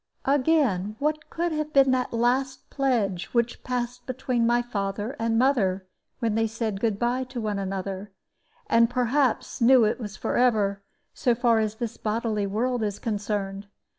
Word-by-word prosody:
Again, 265 - +2
what 305 +3 -2
could 340 +1 -1
have 305 -1 -3
been 270 -1 +5
that 255 -1 0
last 255 +3 0
pledge 225 -10 0
which 235 0 0
passed 245 0 -3
between 255 -2 0
my 240 0 +2
father 205 +1 -3
and 225 0 +1
mother, 205 -8 +2 0.3
when 230 -3 0
they 225 +1 +1
said 220 -2 -3
"good 220 -2 0
by" 245 +3 0
to 255 -1 -6
one 210 -3 -2
another, 195 +1 -4 0.5
and 230 0 +4
perhaps 250 +1 0
knew 250 +1 +7
that - - +4
it - - -3
was 210 -4 -6
forever, 210 -5 +1 0.3
so 245 -2 +1
far 235 -1 +3
as 215 -1 -1
this 230 0 -5
bodily 215 -1 -1
world 240 +4 -1
is 205 -2 -2
concerned? 205 -2 -3
230 Hz, 165 wpm, -26 LUFS, 210-255 Hz, 0.5 s, knew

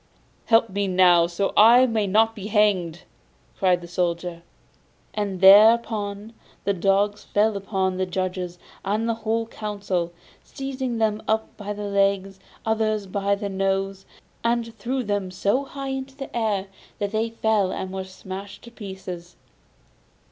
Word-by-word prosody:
'Help 225 0 +4
me 200 +1 -1
now, 180 -2 +5
so 175 +3 -1
that - - -10
I 235 +4 +8
may 220 -4 0
not 220 +3 +3
be 205 -2 -6
hanged!' 200 -6 +1 0.6
cried 180 -3 +3
the 175 - -9
Soldier. 175 -1 -2 0.7
And 200 -3 -3
thereupon 210 +1 +5 0.3
the 200 - +1
dogs 200 +2 +1
fell 215 +1 +1
upon 190 -2 -1
the 185 0 -1
judges 180 -1 -3 0.3
and 215 +3 -1
the 230 - +1
whole 225 0 -1
council, 200 -6 -3 0.3
seized 270 -1 -7 0.2
some 220 -1 0 0.3
by 205 -1 -5
the 210 0 -6
legs, 195 -1 0 0.3
others 215 -2 0
by 200 +1 0
the 200 0 -4
nose, 195 0 -1 0.4
and 230 -1 0
threw 255 +5 -2
them 205 -3 -2
so 200 +9 0
high 275 0 -6
into 265 0 -5
the 270 -2 -8
air 215 -4 0 0.3
that 205 -1 -2
they 220 +1 0
fell 220 -4 +1
and 190 0 -4
were 190 0 -4
smashed 190 +2 -9
into 235 0 -14
pieces. 185 -4 -8
200 Hz, 150 wpm, -24 LUFS, 190-220 Hz, 0.7 s, I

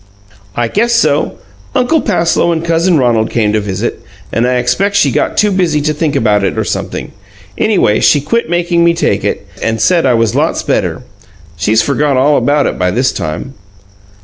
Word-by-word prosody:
"I 120 -1 0
guess 235 - 0
so. 155 -10 +1 0.4
Uncle 300 +5 +2
Passloe 170 -4 +1
and 165 0 -2
cousin 170 +1 +2
Ronald 120 -4 +1
came 105 -3 0
to 110 - +2
visit, 100 +2 -4 0.3
and 115 +2 +1
I 125 - +1
expect 125 +12 0
she 200 - +3
got - - -1
too 210 -1 +3
busy 175 -5 +1
to 150 +1 0
think 150 -1 -2
about 105 -6 +2
it, - - -1
or - - 0
sumpthing. - - -4 0.4
Anyway, 190 - +1
she 145 - +4
quit 230 +8 -2
makin' 175 0 +1
me 170 0 +3
take 170 - 0
it, - - -2 0.2
and 115 0 -1
said 170 +4 +2
I 125 - +3
was 115 -2 +1
lots - - 0
better. - - -1 0.5
She's 110 +7 +1
forgot 140 +1 0
all 145 +3 +3
about 145 0 +2
it - - -3
by 90 0 +1
this 125 +7 +1
time." 85 - -5
145 Hz, 190 wpm, -13 LUFS, 115-170 Hz, 0.5 s, she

